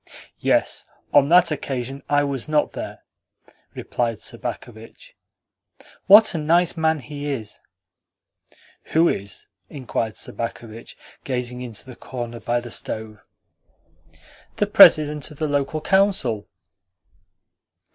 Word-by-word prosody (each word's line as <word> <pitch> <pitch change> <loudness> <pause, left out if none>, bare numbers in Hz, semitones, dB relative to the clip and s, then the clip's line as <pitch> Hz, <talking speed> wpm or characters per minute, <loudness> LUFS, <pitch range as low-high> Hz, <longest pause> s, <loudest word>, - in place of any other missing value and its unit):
"Yes, - - +1 0.3
on 140 -1 +5
that 175 +1 +5
occasion 135 -2 -4
I 145 0 +3
was 140 0 -4
not 150 -1 +1
there," - - -8 0.7
replied 115 -2 -2
Sobakevitch. 110 +1 -8 0.9
"What 210 +1 +8
a 165 - -2
nice 170 +3 +2
man 160 -1 +1
he 145 +1 -7
is!" 110 -6 -6 1.4
"Who 165 +2 +5
is?" 100 -7 -4 0.2
inquired 115 -5 -4
Sobakevitch, 115 -1 -7 0.3
gazing 125 -1 -4
into 115 -4 -6
the 130 -2 -11
corner 120 -2 -7
by 120 +1 -1
the 120 -1 -10
stove. 110 -1 -5 1.4
"The - - +1
President 150 -1 +6
of 150 - -13
the 155 - -1
Local 145 +2 -1
Council." 165 - +1
135 Hz, 110 wpm, -22 LUFS, 120-155 Hz, 1.4 s, What